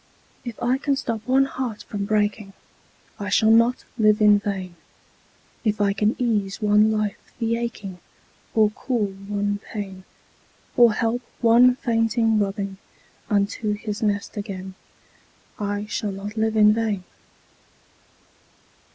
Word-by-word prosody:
If 240 -3 -7
I 250 +2 +2
can 280 0 +1
stop 230 -4 -3
one 265 +1 +4
heart 250 -5 -5
from 200 -1 -4
breaking, 210 -1 0 0.7
I 205 0 -4
shall 220 +3 +4
not 230 +2 +3
live 215 -1 +4
in 210 -1 +6
vain; 195 -3 -4 0.9
If 215 -2 0
I 200 -1 +2
can 210 +2 +1
ease 210 -6 -1
one 210 0 +4
life 215 -2 -1 0.2
the 230 -1 0
aching, 210 -6 -5 0.6
Or 215 -2 +4
cool 215 -3 -2
one 205 +1 -3
pain, 195 -3 -7 0.7
Or 240 -3 +6
help 230 +2 0 0.2
one 245 +2 +6
fainting 225 -2 +1
robin 195 -1 -2 0.5
Unto 210 +1 0
his 210 0 -5
nest 205 0 -1
again, 190 -2 -6 0.9
I 205 0 -2
shall 210 -1 -3
not 200 +2 -7
live 220 0 0
in 210 0 +6
vain. 215 -4 -1
210 Hz, 130 wpm, -23 LUFS, 205-230 Hz, 0.9 s, in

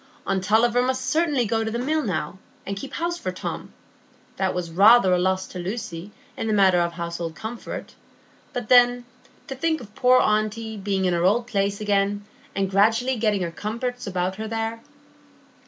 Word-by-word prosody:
Aunt 190 -1 -1
Tulliver 230 +4 +3
must 260 +1 -1
certainly 295 -3 +1
go 225 +1 0
to 220 - -2
the 230 - -3
Mill 305 +6 0
now, 185 - -3 0.3
and 200 - -3
keep 270 +8 -8
house 345 +1 -2
for - - -3
Tom; - - -6 0.7
that 190 -1 0
was 175 -2 -3
rather 195 +2 +6
a 180 - +3
loss 190 +1 0
to 180 - -7
Lucy 180 -1 -5 0.3
in - - -3
the 215 - +1
matter 190 -3 +4
of 170 0 0
household 170 -1 -5
comfort; 225 +4 -7 0.6
but 245 -4 -4
then, 245 0 +5 0.4
to - - -6
think 315 +4 0
of 210 -4 -12
poor 255 +2 +4
aunty 215 +1 0
being 195 -2 -1
in 180 - +2
her 170 0 0
old 220 +6 +3
place 200 -4 -1
again, 205 -1 0 0.3
and 195 -1 -1
gradually 225 +6 +3
getting 205 -6 0
comforts 235 +6 -4
about 185 0 -2
her 220 0 -4
there! 225 +1 -3
215 Hz, 180 wpm, -24 LUFS, 190-245 Hz, 0.7 s, rather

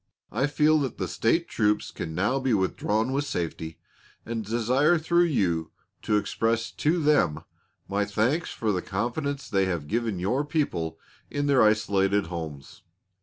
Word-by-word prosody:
I 130 +6 +1
feel 155 +1 +3
that 135 -5 -3
the - - -2
State 165 +10 +1
troops 105 -1 0
can 80 -1 -6
now 105 +10 +1
be 130 -4 +1
withdrawn 105 +4 0
with 140 +1 +1
safety, 80 - -4 0.5
and 115 -1 -3
desire 125 - +2
through 170 +2 +3
you 85 - 0 0.3
to 105 - +1
express 115 +2 0
to 160 +4 +1
them 145 - +2 0.4
my 100 +1 0
thanks 120 +12 0
for 110 -2 -1
the 90 -2 -1
confidence 135 - -3
they 95 -1 +2
have 85 -6 -2
given 115 0 -1
your 105 +11 0
people 145 - -1 0.3
in 145 0 -2
their 140 -3 +4
isolated 100 -2 +3
homes. 80 -5 -7
110 Hz, 155 wpm, -26 LUFS, 95-140 Hz, 0.5 s, their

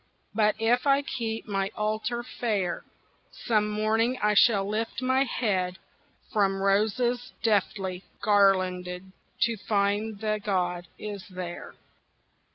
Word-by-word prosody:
But 210 -1 +3
if 240 +4 +2
I 280 0 +4
keep 225 -4 -4
my 195 -1 -1
altar 215 +3 -1
fair, 205 -8 -2 0.6
Some 215 -2 +2
morning 220 +4 +1
I 210 0 +2
shall 200 -2 +5
lift 220 +3 -2
my 260 +1 +2
head 190 -8 -1 0.6
From 195 -3 +2
roses 220 +5 +1
deftly 195 -3 0 0.2
garlanded 185 -3 +2 0.3
To 230 -1 +2
find 205 +1 0
the 215 0 -1
god 180 -3 -1
is 205 -2 -7
there. 180 -2 -7
210 Hz, 115 wpm, -27 LUFS, 195-225 Hz, 0.6 s, shall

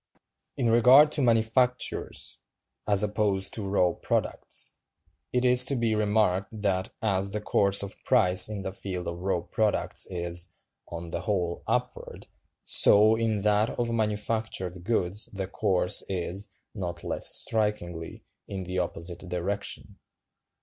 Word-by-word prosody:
In 120 -4 +1
regard 130 +6 +6
to 150 - -1
manufactures, 120 +1 +1 0.5
as 100 -1 +5
opposed 100 -2 0
to 100 -3 -5
raw 90 -3 +2
products, - - -2 0.6
it 125 0 0
is 125 0 +6
to 140 - -2
be 115 -3 0
remarked 105 -1 0
"that, 95 0 0
as 100 -2 0
the 105 - -1
course 100 -1 +1
of 100 - -7
price 90 +3 +4
in 105 -2 -5
the 95 - -4
field 90 -2 -6
of 85 0 -5
raw 90 -1 -1
products 105 +4 -1
is, 85 -1 -2 0.3
on 85 0 -8
the - - -4
whole, 90 -5 -2
upward, - - -3 0.4
so 105 +2 +6
in 110 -3 -1
that 105 +1 +2
of 120 -1 -3
manufactured 105 -4 -2
goods 100 -1 +1
the 95 -1 -3
course 95 -2 +1
is, 95 +2 -3 0.3
not 85 -4 -5
less - - +2
strikingly, 105 -7 -1 0.2
in 95 -1 -5
the 90 +1 -3
opposite 85 0 -5
direction. 90 +2 -4
100 Hz, 135 wpm, -27 LUFS, 90-110 Hz, 0.6 s, regard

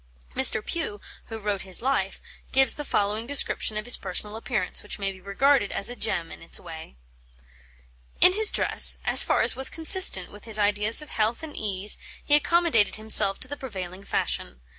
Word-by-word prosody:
Mr. 215 - +5
Pugh, 310 -12 -5 0.3
who 225 - -8
wrote 205 -2 -4
his 190 -1 +1
life, 270 +2 -3 0.3
gives 270 0 +4
the 295 - -8
following 210 -2 -3
description 275 -5 +1
of 215 - -5
his 245 - +7
personal 205 +3 -4
appearance, 225 -4 -4
which 205 - -6
may 195 -1 -4
be 190 -1 -16
regarded 245 +3 0
as 200 - -3
a - - -8
gem 170 -8 -4
in - - -13
its 165 - -4
way: 160 - -12 1.2
"In 365 - +6
his 430 +1 +2
dress, - - +4
as - - +6
far - - 0
as - - +1
was 265 +1 +4
consistent 320 - +2
with 205 - -15
his 220 -2 +1
ideas 210 +5 +1
of 300 - -15
health 220 +7 -3
and 310 -2 -10
ease, 200 -1 -2 0.3
he 290 - 0
accommodated 305 -7 +1
himself 215 -2 +4
to - - -5
the 290 - -7
prevailing 190 -8 -9
fashion. 60 - -4
215 Hz, 185 wpm, -23 LUFS, 200-270 Hz, 1.2 s, his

